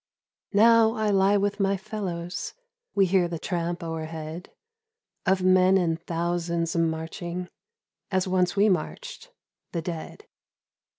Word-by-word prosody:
Now 225 +1 +6
I 215 -1 +1
lie 195 +1 +4
with 200 +1 -1
my 195 0 +2
fellows, 185 -3 -5 0.4
We 195 -1 +5
hear 180 -1 +3
the 170 -1 -4
tramp 170 0 -3
o'erhead 160 +1 -5 0.8
Of 190 -1 +3
men 185 +1 +5
in 170 -3 +1
thousands 170 0 -2
marching 165 +2 -2 0.6
As 190 -1 0
once 180 -1 +1
we 205 +1 +4
marched, - - -3 0.4
the 170 - -1
dead. 165 -2 -6
180 Hz, 120 wpm, -26 LUFS, 170-195 Hz, 0.8 s, Now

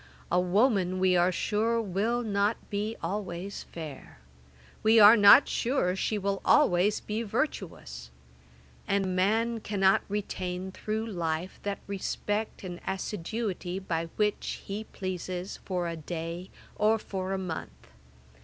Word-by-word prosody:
A 180 - +4
woman, 185 0 +2
we 185 -1 +3
are 175 +1 +4
sure, 220 +5 0
will 225 +4 0
not 205 0 +1
be 210 +2 -2
always 190 +1 -4
fair; 155 -5 -8 0.6
we 220 +1 +5
are 210 +2 +10
not 205 +5 +8
sure 235 -8 0
she 210 +2 -1
will 200 -1 -1
always 205 -8 +4
be 215 +2 -3
virtuous: 190 - -3 0.8
and 195 -2 0
man 225 +5 +1
cannot 195 -3 +2
retain 190 -2 -3
through 215 +3 -3
life 175 -4 -3
that 200 -1 -3
respect 205 +2 -3
and 180 -2 -7
assiduity 190 -1 -3
by 170 -4 -2
which 210 -1 -1
he 205 +2 -5
pleases 185 -1 -5
for 180 -2 -1
a 165 - -3
day 165 +3 -5 0.3
or 215 +1 +3
for 190 -3 -4
a - - 0
month. 180 -4 -6
195 Hz, 130 wpm, -29 LUFS, 180-215 Hz, 0.8 s, are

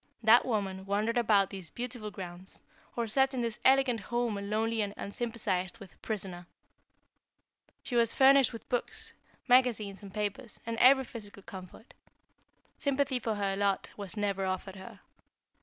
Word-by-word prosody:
That 225 +4 +6
woman 195 -4 -2
wandered 215 +4 +1
about 205 -4 +3
these 190 -4 -7
beautiful 240 -3 -5
grounds, 185 -2 -9 0.4
or 235 -1 -1
sat 265 +4 +2
in 250 - -1
this 230 -2 -3
elegant 265 -3 +4
home 240 +1 -1
a 200 - -4
lonely 220 +2 0
and 205 -1 -3
unsympathized 200 -5 -3
with 200 -5 -14
prisoner. 185 -5 -4 1.4
She 245 - -4
was 230 -1 +4
furnished 270 -1 +6
with 230 - -10
books, 245 - -3 0.3
magazines 235 -6 +3
and 200 -2 -10
papers, 210 +4 -4
and 230 0 -2
every 265 +3 +6
physical 205 -5 -10
comfort. 190 +5 -11 0.9
Sympathy 280 -2 +1
for 225 -2 -2
her 200 -1 -1
lot 200 -1 0
was 200 +1 -5
never 200 -2 0
offered 190 +1 -3
her. 190 - -11
215 Hz, 150 wpm, -31 LUFS, 195-240 Hz, 1.4 s, That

